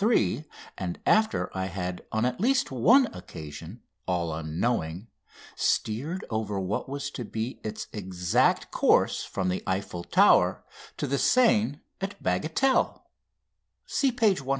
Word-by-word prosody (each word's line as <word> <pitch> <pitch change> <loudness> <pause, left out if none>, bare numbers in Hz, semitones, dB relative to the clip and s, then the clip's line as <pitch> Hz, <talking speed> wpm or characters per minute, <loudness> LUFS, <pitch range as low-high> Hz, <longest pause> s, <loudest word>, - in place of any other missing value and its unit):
3," 210 -8 +2 0.3
and 90 -3 -4
after 215 - +2
I 95 0 -1
had 90 -1 -4
on 110 +2 +1
at 125 0 -1
least 260 - +2
one 230 - +5
occasion 80 +5 -9 0.2
all 85 -3 0
unknowing 80 +4 -2 0.5
steered 145 - -1
over 110 -2 -1
what 95 +6 -2
was 140 0 -4
to 125 - -5
be 115 +3 -5
its 110 - -4
exact 90 -4 +1
course - - +3
from 95 -1 -2
the 90 - -1
Eiffel 95 -2 -2
Tower - - +4 0.3
to - - -2
the 140 +1 0
Seine 145 - +3 0.2
at 195 +1 -3
Bagatelle 160 - +1 0.8
(see 275 -2 +1
page 215 - +2
127). 135 - -13
110 Hz, 135 wpm, -27 LUFS, -, 0.8 s, one